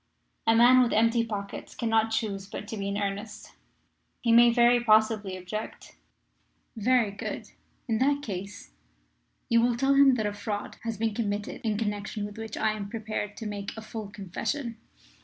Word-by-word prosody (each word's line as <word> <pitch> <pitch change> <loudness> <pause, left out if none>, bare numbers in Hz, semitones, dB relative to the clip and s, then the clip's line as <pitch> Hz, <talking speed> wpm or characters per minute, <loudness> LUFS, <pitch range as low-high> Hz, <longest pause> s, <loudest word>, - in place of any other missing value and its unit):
A 225 - +5
man 245 +2 +7
with 245 - +2
empty 230 +1 +3
pockets 205 -3 -6
cannot 225 -1 +1
choose 205 -3 -2
but 205 +1 -7
be 200 -3 -3
in 200 0 -2
earnest. 205 +1 -4 0.7
"He 235 - +2
may 235 +1 +7
very 240 0 +4
possibly 215 -3 +3
object. 185 +4 -7 0.8
"Very 230 -1 +2
good. 200 - -6 0.4
In 225 -2 0
that 285 +2 +2
case 200 -1 -6 0.8
you 230 0 +4
will 240 0 +2
tell 270 +2 +3
him 275 -1 +6
that 220 -3 -1
a 205 - -1
fraud 205 0 -5
has 225 -2 -4
been 220 0 0
committed 205 -2 -3
in 215 -2 0
connection 205 -1 -3
with 205 +1 -9
which 225 -1 -6
I 220 - +2
am 205 -2 -5
prepared 215 -2 -4
to 225 - -6
make 205 0 -5
a - - -5
full 220 -2 -7
confession. 225 +6 -4
220 Hz, 170 wpm, -28 LUFS, 205-230 Hz, 0.8 s, man